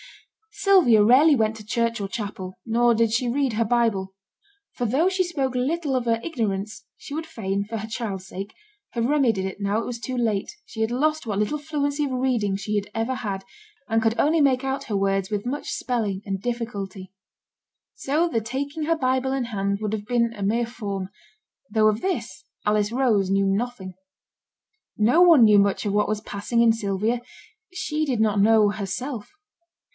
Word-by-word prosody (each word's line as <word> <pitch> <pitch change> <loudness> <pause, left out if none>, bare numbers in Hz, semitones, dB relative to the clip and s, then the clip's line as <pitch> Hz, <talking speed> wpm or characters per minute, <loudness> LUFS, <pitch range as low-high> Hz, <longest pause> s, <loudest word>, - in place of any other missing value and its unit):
Sylvia 370 - +5
rarely 275 +7 +6
went 220 -2 +1
to 215 - -11
church 230 0 -1
or 200 - -2
chapel, 190 -2 -6
nor 235 +1 +3
did 230 -1 +2
she 240 +2 +1
read 265 0 0
her 225 +2 +1
Bible; 220 -5 0 0.6
for 245 - -2
though 280 - +2
she 375 0 +1
spoke 275 -7 -2
little 285 +3 0
of 250 -2 0
her 230 -1 +1
ignorance, 220 -6 -3 0.2
and 285 - -5
would 320 +1 -3
fain, 200 -10 -3
for 225 +2 -5
her 220 +1 -5
child's 210 -5 -4
sake, 195 +3 -7 0.4
have 235 -1 -1
remedied 245 -8 +2
it 190 +1 -5
now 200 +1 0
it - - -4
was 240 -1 -5
too 255 +3 -4
late, 220 -5 0
she 220 - -7
had 220 +1 +1
lost 305 +4 0
what 205 -3 -2
little 210 +8 0
fluency 290 -1 -1
of 275 - -4
reading 250 -6 0
she 210 +2 -3
had 205 0 -1
ever 225 +3 -1
had, 195 -5 -4 0.4
and 225 -1 +1
could 225 0 +1
only 315 +2 +3
make 265 -2 +3
out 270 0 -2
her 205 - -1
words 195 0 0
with 210 0 -3
much 275 +4 -3
spelling 215 -6 -2
and 195 -2 -3
difficulty. 200 -5 -5 0.8
So 305 +5 0
the 230 -9 -1
taking 280 +7 -4
her 330 +2 +1
Bible 260 -1 0
in 265 -2 -1
hand 200 -3 -2
would 215 0 -2
have 210 -1 -3
been 235 0 +1
a 205 -3 -6
mere 230 +4 +1
form; 200 -5 -5 0.6
though 215 -1 +3
of 215 +1 +1
this 380 -1 -3 0.2
Alice 210 0 +2
Rose 230 -7 +2
knew 195 0 +2
nothing. 195 -1 -2 1.0
No 240 +11 +4
one 335 -8 +7
knew 210 -1 +6
much 200 +2 +1
of 200 - 0
what 210 0 +2
was 215 0 -1
passing 215 +3 -1
in 230 -1 +5
Sylvia; 215 +2 -1 0.5
she 310 -4 -2
did 260 -7 -1
not 210 -2 +2
know 215 0 +5
herself. 210 +4 -4
225 Hz, 190 wpm, -24 LUFS, 205-260 Hz, 1.0 s, one